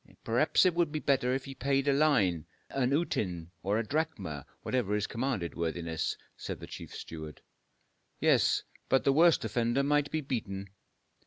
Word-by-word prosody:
"Perhaps - - +3
it 180 - +4
would 170 -2 +1
be 155 - -2
better 135 -4 +2
if 130 0 -1
he 135 - -7
paid 135 +1 0
a 140 - +5
line, 105 - +3 0.2
an 130 -2 +1
uten 90 - -1
or 100 +4 +1
a 115 - 0
drachma, 105 - -2 0.2
whatever 115 -5 0
is 105 -1 0
commanded, 115 -8 -2
worthiness," 80 -1 -2 0.2
said - - -6
the - - -7
chief - - -9
steward. 80 -2 -8 0.8
"Yes; - - +3 0.3
but 135 - +4
the 140 - +4
worst 165 +2 +5
offender 120 +3 +1
might 145 0 +2
be 155 - -1
beaten." 100 -8 -4
125 Hz, 165 wpm, -31 LUFS, 95-145 Hz, 0.8 s, a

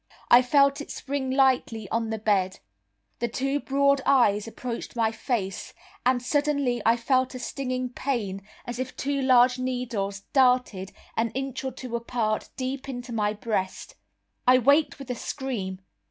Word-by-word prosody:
I 240 - +9
felt 280 +2 +3
it - - -9
spring 275 -1 -3
lightly 260 -5 +2
on 225 -1 -1
the 220 - -2
bed. 195 -3 +1 0.6
The 235 - 0
two 270 +4 -1
broad 280 0 +2
eyes 225 -6 +3
approached 235 +1 -6
my 225 -2 +2
face, 220 -5 -3 0.3
and 250 -1 +2
suddenly 285 -3 +1
I 230 +1 +4
felt 255 +2 +1
a - - -5
stinging 255 -1 -3
pain 230 -7 -3 0.2
as 240 -1 -5
if 255 0 -4
two 280 0 -1
large 255 -1 +5
needles 235 -6 -2
darted, 250 -8 +3 0.2
an 225 +1 +1
inch 270 0 -3
or 265 - -2
two 250 -2 -6
apart, 230 -2 -1
deep 260 +1 -4
into 245 -1 -6
my 210 -2 +1
breast. 210 -3 -3 0.5
I 255 0 +8
waked 285 +6 +3
with 275 -3 -7
a - - -2
scream. 220 -9 -4
250 Hz, 155 wpm, -26 LUFS, 225-265 Hz, 0.6 s, I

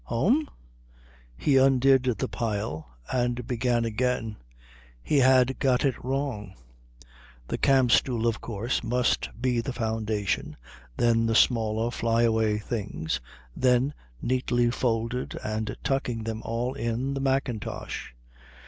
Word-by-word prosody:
"Home?" 230 - +1 0.9
He 140 -3 +3
undid 135 0 +5
the 130 +1 0
pile 100 - -4 0.2
and 125 -1 0
began 120 -1 0
again. 115 -1 -1 0.7
He 145 - +2
had 130 0 +4
got 130 0 +2
it 135 -4 -1
wrong. 130 -7 -3 0.9
The - - -2
camp 130 -3 +4
stool, 120 -3 +2
of 115 -1 0
course, 115 +2 -2
must 125 +1 +1
be 125 -1 +1
the 135 +2 -4
foundation, 110 -4 -2 0.4
then 115 -1 +3
the 115 - +1
smaller 115 -1 +2
fly 115 0 +1
away 110 -2 +2
things, 100 - -3 0.3
then, 130 +2 +2 0.3
neatly 120 -1 +1
folded 120 0 -1
and 110 0 -3
tucking 125 -4 -1
them 110 0 -4
all 120 +3 -2
in, 120 +4 -2
the 135 - -3
mackintosh. 130 - -2
120 Hz, 120 wpm, -27 LUFS, 110-130 Hz, 0.9 s, undid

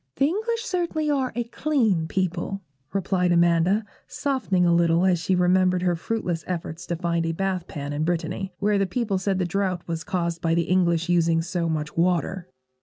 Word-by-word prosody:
'The 275 - +3
English 445 +8 -1
certainly 340 -8 -1
are 265 -3 0
a 240 - 0
clean 230 - 0
people,' 185 +2 -2 0.3
replied 185 -2 +1
Amanda, 175 +4 +3 0.2
softening 255 -11 0
a 170 - +4
little 170 +1 +3
as 180 -2 +3
she 185 +3 +1
remembered 180 0 +3
her 175 -1 +2
fruitless 175 -2 -3
efforts 170 -1 -5
to 170 - -1
find 170 0 -1
a 165 - -1
bath 190 0 -2
pan 145 -1 -5
in 150 +1 -1
Brittany, 175 +3 -2
where 205 0 +1
the 195 - +1
people 205 -1 -1
said 190 0 0
the 185 - 0
drought 185 -1 -2
was 165 -1 -3
caused 170 -2 -2
by 165 -1 +1
the 170 - +2
English 170 -1 +2
using 165 -2 +3
so 175 -1 -2
much 150 -1 -3
water. 180 +1 0
180 Hz, 185 wpm, -24 LUFS, 170-195 Hz, 0.3 s, a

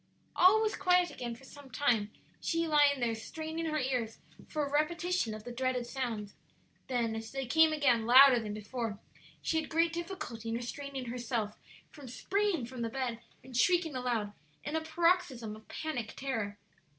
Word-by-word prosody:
All 405 +5 +6
was 430 - 0
quiet 360 -1 +3
again 240 -1 -5
for 235 - -17
some 280 0 -13
time, 230 -4 +1 0.3
she 330 -1 0
lying 290 -2 +4
there, 235 -2 +1
straining 315 +8 -5
her 310 -1 0
ears 250 -5 -1 0.3
for 305 -2 -1
a 280 - -6
repetition 315 -4 0
of 215 - -9
the 245 - -7
dreaded 255 0 -1
sounds; 235 -6 -4 0.5
then, 235 -3 0
as 225 0 -6
they 270 -1 -3
came 320 +5 +5
again 250 -7 +2
louder 260 0 +9
than 215 -2 -5
before, 215 0 -4 0.5
she 320 -1 +1
had 310 - -9
great 330 +1 +2
difficulty 335 - -5
in 225 - -1
restraining 265 +2 -5
herself 235 -3 -3 0.4
from 290 -4 -11
springing 380 - 0
from 250 0 -7
the 230 - -1
bed 245 -2 -3 0.2
and 260 -1 -11
shrieking 330 +4 +3
aloud, 235 -5 -1 0.3
in 295 +2 -3
a 320 - +1
paroxysm 315 -9 +1
of 215 - -16
panic 245 -8 -4
terror. 225 -7 -3
260 Hz, 175 wpm, -32 LUFS, 230-315 Hz, 0.5 s, louder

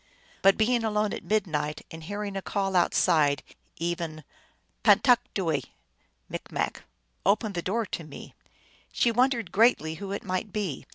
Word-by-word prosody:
But 195 0 +5
being 235 +2 +2
alone 210 -1 0
at - - -5
midnight, 160 -8 -1
and 160 0 -9
hearing 205 +3 -4
a 195 - -2
call 195 -1 -2
outside, 155 -5 +3 0.3
even 165 -2 -3 0.6
"Pantakdooe! 205 - +3 0.4
" - - -10
M., - - +1 0.5
"Open 210 +2 +2
the 175 - -2
door 225 +6 -1
to 170 - -5
me! 150 -2 -11 0.3
" - - -32
she 235 - +2
wondered 240 -4 +1
greatly 205 -7 +3
who 195 -1 -5
it 200 - -4
might 185 +2 -3
be. 195 -9 -3
195 Hz, 150 wpm, -27 LUFS, 165-215 Hz, 0.6 s, But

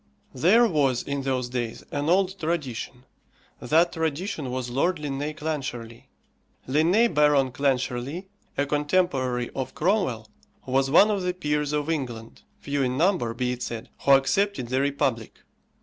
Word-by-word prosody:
There 190 - +5
was, 140 - +1
in 140 0 -3
those 130 -2 -1
days, 120 -2 -4
an 145 +2 -1
old 190 +1 +2
tradition. 135 -6 -3 0.6
That 165 +3 +2
tradition 160 -2 -2
was 125 -1 -4
Lord 170 +8 +1
Linnæus 150 +1 -4
Clancharlie. 130 -7 -5 0.6
Linnæus 170 - +3
Baron 145 -3 +3
Clancharlie, 135 +4 -1 0.3
a 140 - +2
contemporary 145 -5 0
of 130 -1 -5
Cromwell, 155 - 0 0.4
was 135 +1 +1
one 200 +9 +6
of 200 -2 -1
the 180 0 -2
peers 150 -3 -1
of 150 0 -1
England 120 -8 -4 0.2
few 145 0 -2
in 130 -1 0
number, 165 - +1
be 125 0 -1
it 125 0 -5
said 115 -1 -5
who 140 - +4
accepted 135 - +2
the 130 +1 +1
republic. 140 -5 -1
140 Hz, 145 wpm, -25 LUFS, 125-160 Hz, 0.6 s, one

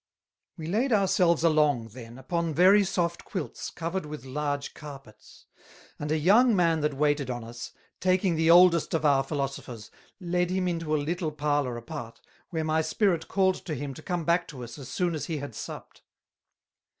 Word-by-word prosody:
We 160 - -6
laid 225 +11 0
our 200 -3 +3
selves 170 -3 +3
along, 150 -8 +2
then, 115 +1 -11
upon 165 +4 -2
very 195 +5 +6
soft 175 -3 -1
Quilts, 185 -7 -5
covered 170 0 -4
with 150 -4 -8
large 145 +1 -3
Carpets; 135 -8 -13 0.5
and 150 0 -3
a 155 - +2
young 215 +9 +5
man 165 -3 +3
that 150 -2 -1
waited 145 -1 +1
on 120 -2 -4
us, 120 +1 -8 0.3
taking 185 -1 +2
the 160 +1 +2
oldest 170 -1 +6
of 155 -1 -1
our 140 -2 +4
Philosophers, 135 -5 -5 0.3
led 180 -1 0
him 185 0 0
into 165 -3 -1
a - - +2
little 165 0 -2
parlour 145 -4 -1
apart, 120 -2 -8 0.3
where 160 -2 -2
my 155 0 +1
Spirit 165 +1 0
called 190 -1 +1
to 155 - -3
him 140 0 -5
to 155 - -11
come 175 -1 -3
back 170 +2 +2
to 130 -6 -8
us 120 +3 -9
as 130 -2 -9
soon 175 +5 -1
as 155 - -3
he 165 -3 -2
had 145 -4 -6
supped. - - -9
155 Hz, 185 wpm, -27 LUFS, 140-175 Hz, 0.5 s, very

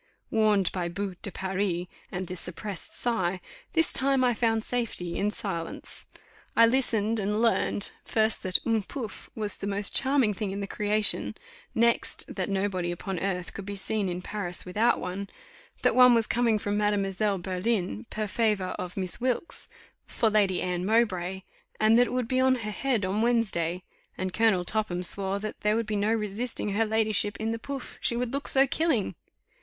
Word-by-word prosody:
Warned 210 -4 +3
by 175 -2 -2
boue 195 +2 -3
de 200 - -4
Paris 190 -1 -1 0.3
and 185 0 -3
the 180 - -6
suppressed 185 +2 -5
sigh, 190 -7 0 0.3
this 325 -1 +3
time 270 -1 +2
I 245 -1 +4
found 225 -1 +1
safety 220 -8 -2
in 205 - +1
silence. 180 -5 -5 0.5
I 230 - +9
listened, 230 -3 +1
and 210 +1 0
learned, 225 -3 +2
first 220 0 +2
that 185 -1 +2
un 225 -2 +2
pouf 225 +1 -7
was 210 -2 -1
the 200 - -3
most 200 0 +2
charming 265 -5 +4
thing 210 0 -3
in 195 +1 -4
the 200 - -2
creation; 210 +1 0 0.4
next, 235 +1 +1
that - - -2
nobody 190 -3 -1
upon 180 +1 -4
earth 180 -1 -2
could 200 0 -7
be 200 - -4
seen 200 0 -1
in 180 +1 -4
Paris 185 -4 -2
without 215 +6 +2
one; 190 +2 -4 0.5
that - - +4
one 250 -1 +8
was 230 -1 +3
coming 230 -1 +2
from 205 0 -1
Mademoiselle 205 -1 +1
Berlin, 180 - -2
per 215 0 -2
favour 205 -2 0
of 180 0 -5
Miss 185 +3 -2
Wilkes, 255 +5 -1 0.4
for 225 -3 +1
Lady 200 -4 +2
Anne 180 -1 -1
Mowbray, 190 -4 +1 0.4
and 215 +1 +5
that 245 - +5
it - - -6
would 250 -2 0
be 255 0 +1
on 260 0 +4
her 220 -4 -4
head 235 -2 0
on 195 +3 0
Wednesday; 190 -7 +1 0.3
and 185 0 -3
Colonel 205 -4 +3
Topham 195 -3 0
swore 195 +2 +2
there 210 +1 -1
would 230 0 0
be 215 0 -2
no 205 +2 +1
resisting 220 +1 -1
her 210 +3 +1
ladyship 215 -2 +1
in 220 +1 -1
the 230 - -3
pouf, 275 +1 -7
she 235 - 0
would 245 +1 -2
look 280 +1 -2
so 270 0 +5
killing. 275 - 0
210 Hz, 180 wpm, -28 LUFS, 190-230 Hz, 0.5 s, I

